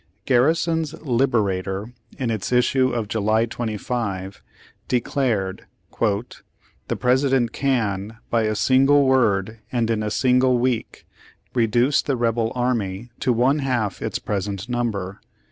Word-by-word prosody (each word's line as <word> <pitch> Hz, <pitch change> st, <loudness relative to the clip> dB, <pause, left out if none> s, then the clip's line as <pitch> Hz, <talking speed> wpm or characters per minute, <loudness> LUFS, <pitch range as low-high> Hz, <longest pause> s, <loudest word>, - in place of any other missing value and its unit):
Garrison's 160 Hz, +4 st, +1 dB
Liberator, 110 Hz, -5 st, 0 dB, 0.2 s
in 125 Hz, -4 st, -1 dB
its 110 Hz, -1 st, -3 dB
issue 130 Hz, +1 st, +3 dB
of 115 Hz, -4 st, -2 dB
July 110 Hz, +1 st, +1 dB
25, 105 Hz, -4 st, -4 dB, 0.5 s
declared: 115 Hz, -6 st, -1 dB, 0.3 s
'The 110 Hz, +1 st, -4 dB
President 130 Hz, -1 st, +2 dB
can, 110 Hz, -6 st, -1 dB
by 115 Hz, -, +3 dB
a 110 Hz, 0 st, 0 dB
single 135 Hz, +5 st, +4 dB
word, 110 Hz, -5 st, +2 dB
and 115 Hz, -2 st, 0 dB
in 110 Hz, -1 st, 0 dB
a 105 Hz, -, -1 dB
single 125 Hz, +2 st, +3 dB
week, 120 Hz, -2 st, -2 dB, 0.5 s
reduce 120 Hz, +4 st, +2 dB
the 135 Hz, -3 st, -1 dB
rebel 115 Hz, -1 st, 0 dB
army 120 Hz, -3 st, -2 dB
to 125 Hz, -, +1 dB
one 125 Hz, +5 st, +2 dB
half 125 Hz, -7 st, -1 dB
its -, -, -2 dB
present 100 Hz, 0 st, -3 dB
number." 110 Hz, -6 st, -3 dB
120 Hz, 120 wpm, -22 LUFS, 105-130 Hz, 0.5 s, single